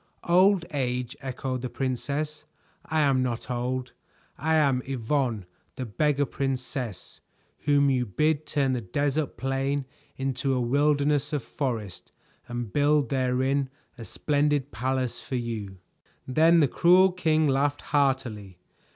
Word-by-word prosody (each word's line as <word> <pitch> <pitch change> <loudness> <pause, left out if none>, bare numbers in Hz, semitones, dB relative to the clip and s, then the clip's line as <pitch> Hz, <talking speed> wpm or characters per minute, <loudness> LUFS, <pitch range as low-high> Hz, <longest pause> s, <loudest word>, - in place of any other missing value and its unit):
"Old 185 +1 +5
age," 125 -2 -2
echoed 130 -1 -4
the 125 - -4
princess. 140 +4 -3 0.4
"I 160 0 +1
am 135 -3 +3
not 125 0 -3
old. 125 +1 -2 0.4
I 160 +2 0
am 140 -5 +3
Yvonne, 125 -4 -1 0.3
the 130 - -4
Beggar 145 +5 +1
Princess, 130 - -4 0.5
whom 140 -1 +4
you 125 -2 0
bid 150 +8 0
turn 140 -3 +1
the 125 - -1
desert 145 +8 -1
plain 135 +3 -1 0.3
into 135 0 -1
a - - +1
wilderness 145 +3 +2
of 145 -5 -1
forest 115 - -4 0.4
and 120 -3 -5
build 145 0 +3
therein 130 +1 +1 0.3
a 115 - -9
splendid 145 +2 0
palace 125 +1 -2
for 130 - -5
you." 110 -6 -4 0.5
Then 160 +5 +5
the 145 - +4
cruel 180 +6 +5
king 160 -4 +2
laughed 140 +1 +1
heartily. 130 -9 0
135 Hz, 130 wpm, -26 LUFS, 125-145 Hz, 0.5 s, Old